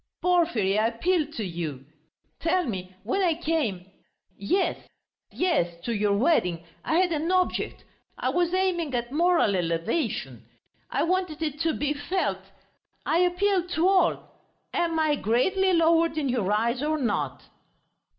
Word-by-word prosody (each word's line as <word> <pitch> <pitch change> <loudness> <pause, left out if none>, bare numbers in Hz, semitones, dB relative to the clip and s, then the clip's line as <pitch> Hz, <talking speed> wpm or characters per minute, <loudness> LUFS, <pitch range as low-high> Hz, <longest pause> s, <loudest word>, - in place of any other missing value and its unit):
"Porfiry, 325 - +2
I 220 - +3
appeal 310 +7 0
to 220 -8 -3
you.... 160 -7 -5 0.5
Tell 355 +2 +1
me, 185 -6 -5
when 255 - 0
I 345 -4 +2
came... 305 - -1 0.5
yes... 370 - 0 0.5
yes, 175 - 0
to 235 - -1
your 205 -1 +1
wedding, 180 - +1 0.2
I 320 - 0
had 365 -1 +3
an 320 +2 -1
object. 370 -1 0 0.3
I - - -1
was 350 -1 +1
aiming 355 -6 0
at 240 0 -2
moral 335 - +3
elevation.... 170 - -2 0.4
I - - 0
wanted 350 -3 -1
it 300 -2 -3
to 325 0 +1
be 295 0 -1
felt.... 300 +6 -2 0.6
I 330 - +2
appeal 360 +1 +2
to 355 0 +1
all: 385 -1 +2 0.4
am 335 -1 0
I 310 -2 +2
greatly 375 - +2
lowered 330 -1 +3
in 285 -3 0
your 225 -6 0
eyes 235 +4 +1
or 310 +1 0
not?" 190 - -2
310 Hz, 145 wpm, -26 LUFS, 215-350 Hz, 0.6 s, I